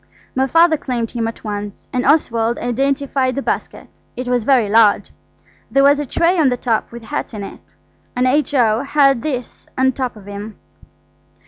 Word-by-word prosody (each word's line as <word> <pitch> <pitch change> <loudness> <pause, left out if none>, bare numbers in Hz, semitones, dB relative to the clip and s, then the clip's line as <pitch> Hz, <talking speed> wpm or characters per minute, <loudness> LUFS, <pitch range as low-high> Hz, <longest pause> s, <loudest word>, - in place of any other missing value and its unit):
My 265 +1 +1
Father 330 +2 +4
claimed 245 -5 -3
him 230 -2 -2
at 225 - -7
once, 205 -1 -6
and 250 0 0
Oswald 235 -6 +2
identified 270 +1 -1
the 275 - -3
basket. - - -4 0.3
It 250 0 -4
was 245 -3 0
very 255 -6 +3
large. 215 0 +3 0.6
There 275 - +3
was 285 +1 +5
a 295 - -3
tray 340 +6 +1
on 295 -4 +4
the 245 - -1
top 230 -3 -1
with 235 0 -10
hats 290 -2 -5
in 205 - -5
it, - - -12 0.4
and 250 +1 +1
H.O. 255 -5 +2
had 275 -3 +3
this 255 -5 -5
on 260 0 +3
top 255 -2 -4
of 210 -2 -14
him. 205 +2 -8
250 Hz, 180 wpm, -18 LUFS, 225-275 Hz, 0.6 s, was